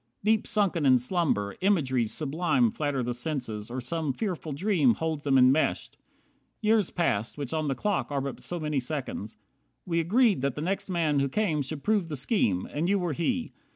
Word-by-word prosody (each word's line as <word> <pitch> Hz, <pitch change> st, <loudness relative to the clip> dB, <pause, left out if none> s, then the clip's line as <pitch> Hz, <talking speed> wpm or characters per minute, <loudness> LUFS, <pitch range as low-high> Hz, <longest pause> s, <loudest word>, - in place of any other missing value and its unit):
Deep 215 Hz, +1 st, +2 dB
Sunken 200 Hz, -7 st, +1 dB
in 130 Hz, -2 st, +6 dB
slumber, 125 Hz, -, 0 dB
imageries 130 Hz, -, +1 dB
sublime 175 Hz, -, +1 dB
Flatter 145 Hz, -, -1 dB
the 120 Hz, +1 st, -2 dB
senses, 120 Hz, -5 st, -4 dB
or 125 Hz, +2 st, -4 dB
some 145 Hz, +3 st, -2 dB
fearful 180 Hz, -, -3 dB
dream 150 Hz, -, +2 dB
Holds 160 Hz, -2 st, -3 dB
them 135 Hz, -2 st, +4 dB
enmeshed. 130 Hz, +4 st, +3 dB, 0.6 s
Years 215 Hz, -3 st, +2 dB
pass 115 Hz, -, -1 dB
which 140 Hz, -2 st, -4 dB
on 155 Hz, -1 st, -1 dB
the 135 Hz, -, 0 dB
clock 205 Hz, -4 st, -1 dB
Are 140 Hz, -, 0 dB
but 135 Hz, -1 st, -5 dB
so 175 Hz, -, -5 dB
many 150 Hz, -3 st, -1 dB
seconds. 125 Hz, -6 st, -5 dB, 0.5 s
We 170 Hz, -2 st, 0 dB
agreed 205 Hz, -, +3 dB
That 140 Hz, -1 st, -1 dB
the 150 Hz, -, -4 dB
next 190 Hz, +4 st, -2 dB
man 160 Hz, -5 st, +1 dB
who 140 Hz, 0 st, +1 dB
came 165 Hz, -3 st, 0 dB
should 140 Hz, +1 st, -5 dB
prove 205 Hz, -5 st, +1 dB
the 150 Hz, -, -3 dB
scheme; 130 Hz, -, 0 dB
And 160 Hz, +5 st, 0 dB
you 200 Hz, -, +3 dB
were 175 Hz, -4 st, -1 dB
he. 240 Hz, -, -1 dB
155 Hz, 190 wpm, -28 LUFS, 135-185 Hz, 0.6 s, in